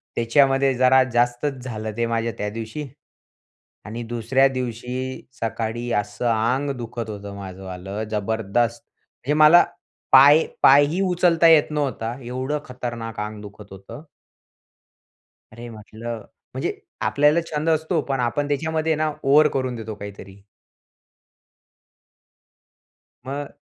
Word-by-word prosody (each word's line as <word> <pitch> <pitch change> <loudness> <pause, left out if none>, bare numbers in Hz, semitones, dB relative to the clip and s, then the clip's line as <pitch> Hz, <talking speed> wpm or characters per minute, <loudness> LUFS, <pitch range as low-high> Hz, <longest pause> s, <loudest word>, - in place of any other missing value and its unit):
त्याच्यामध्ये 135 +3 +3
जरा 130 +1 +5
जास्तच 120 +2 0
झालं 110 -3 -5
ते 120 - +1
माझ्या 115 0 -1
त्या 105 - -2
दिवशी. 115 +7 -6 1.0
आणि 115 +3 -6
दुसऱ्या 120 +3 +2
दिवशी 130 0 -4 0.2
सकाळी 115 +1 -3
असं 105 +4 -7
आंग 120 +6 0
दुखत 115 -1 -6
होतं 100 -1 -7
माझंवालं, 95 +1 -7
जबरदस्त! 110 +4 -1
म्हणजे 145 +4 -7
मला 170 +3 +8 0.5
पाय 145 +4 +8 0.2
पायही 145 +6 +6
उचलता 175 -3 +3
येत 155 -2 +5
नव्हता, 130 -6 -2
एवढं 130 +5 -3
खतरनाक 120 -3 -6
आंग 105 0 -5
दुखत 105 0 -12
होतं. 95 +8 -11 1.5
अरे 120 +2 -9
म्हटलं, 110 +1 -8 0.3
म्हणजे - - -3 0.3
आपल्याला 150 +3 +3
छंद 150 +2 -1
असतो 160 +1 +1
पण 135 - 0
आपण 125 +4 -1
त्याच्यामध्ये 160 +2 0
ना 155 0 0
ओव्हर 150 +3 +5
करून 130 -2 -2
देतो 110 -2 -6
काहीतरी. 100 -1 -10 2.9
मग 140 +1 -5
120 Hz, 115 wpm, -22 LUFS, 110-145 Hz, 2.9 s, मला